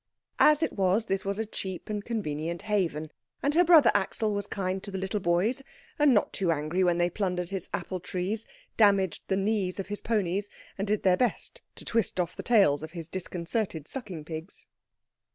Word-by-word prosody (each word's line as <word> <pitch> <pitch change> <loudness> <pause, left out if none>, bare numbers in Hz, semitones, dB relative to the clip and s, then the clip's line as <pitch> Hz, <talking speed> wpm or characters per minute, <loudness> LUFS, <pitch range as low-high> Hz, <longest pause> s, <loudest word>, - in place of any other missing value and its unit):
As 305 +1 +6
it - - 0
was, 195 +3 +2
this 195 -3 -1
was 200 0 -2
a 220 - -1
cheap 190 -3 -6
and 210 -1 -3
convenient 170 -7 -3
haven, 170 -8 -1 0.3
and 285 - +2
her 345 +3 +5
brother 325 -7 +7
Axel 205 +2 0
was 205 0 -2
kind 190 -1 -2
to 200 - -6
the 195 - -4
little 190 +2 -2
boys, 185 +9 +1 0.4
and 295 -1 +6
not 210 -5 +2
too 185 -4 +1
angry 160 +4 0
when 175 -1 +3
they 175 0 +3
plundered 180 -1 -2
his 195 -3 -5
apple 185 - -3
trees, 185 +5 -3 0.3
damaged 200 -5 +4
the 190 - +1
knees 195 -2 0
of 195 - -4
his 205 - -2
ponies, 205 -2 0 0.3
and 200 +1 -3
did 210 0 0
their 185 -1 +4
best 245 - -1
to - - -7
twist 225 -5 0
off 175 - -1
the - - -5
tails 195 -12 +4
of 155 +1 -8
his 165 -3 -5
disconcerted 175 -2 -3
sucking 190 - -6
pigs. 160 +3 -7
195 Hz, 195 wpm, -28 LUFS, 175-215 Hz, 0.4 s, brother